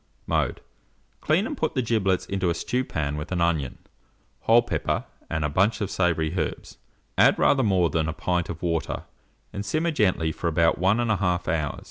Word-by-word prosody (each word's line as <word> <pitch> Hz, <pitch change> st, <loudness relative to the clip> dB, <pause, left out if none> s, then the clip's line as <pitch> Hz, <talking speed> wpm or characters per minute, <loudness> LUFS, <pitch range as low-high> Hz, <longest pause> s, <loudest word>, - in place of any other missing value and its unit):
Mode. -, -, -1 dB, 0.6 s
Clean, 160 Hz, +7 st, +2 dB
and 300 Hz, -, -4 dB
put 160 Hz, -, -2 dB
the 130 Hz, -, +1 dB
giblets 100 Hz, -5 st, +1 dB
into 95 Hz, -2 st, -1 dB
a 85 Hz, -, 0 dB
stewpan 80 Hz, -, -2 dB
with 75 Hz, +4 st, -6 dB
an 90 Hz, -, -1 dB
onion, 80 Hz, -6 st, 0 dB, 0.6 s
whole 115 Hz, +1 st, +4 dB
pepper, 120 Hz, -, -2 dB, 0.2 s
and 80 Hz, -2 st, -1 dB
a -, -, +2 dB
bunch 100 Hz, +10 st, +2 dB
of 100 Hz, -3 st, -3 dB
savoury 85 Hz, -3 st, +1 dB
herbs; 85 Hz, -, -4 dB, 0.4 s
add -, -, +6 dB
rather 135 Hz, -, +4 dB
more 95 Hz, -, +2 dB
than 80 Hz, 0 st, 0 dB
a -, -, -2 dB
pint 90 Hz, +1 st, -1 dB
of 80 Hz, 0 st, -6 dB
water, 85 Hz, -2 st, -1 dB, 0.5 s
and 100 Hz, -, -4 dB
simmer 160 Hz, +9 st, 0 dB
gently 90 Hz, -, +1 dB
for 85 Hz, -, -4 dB
about 85 Hz, 0 st, +2 dB
1 95 Hz, +4 st, +3 dB
1/2 95 Hz, -7 st, 0 dB
hour. 75 Hz, -3 st, -1 dB
90 Hz, 180 wpm, -25 LUFS, 80-110 Hz, 0.6 s, add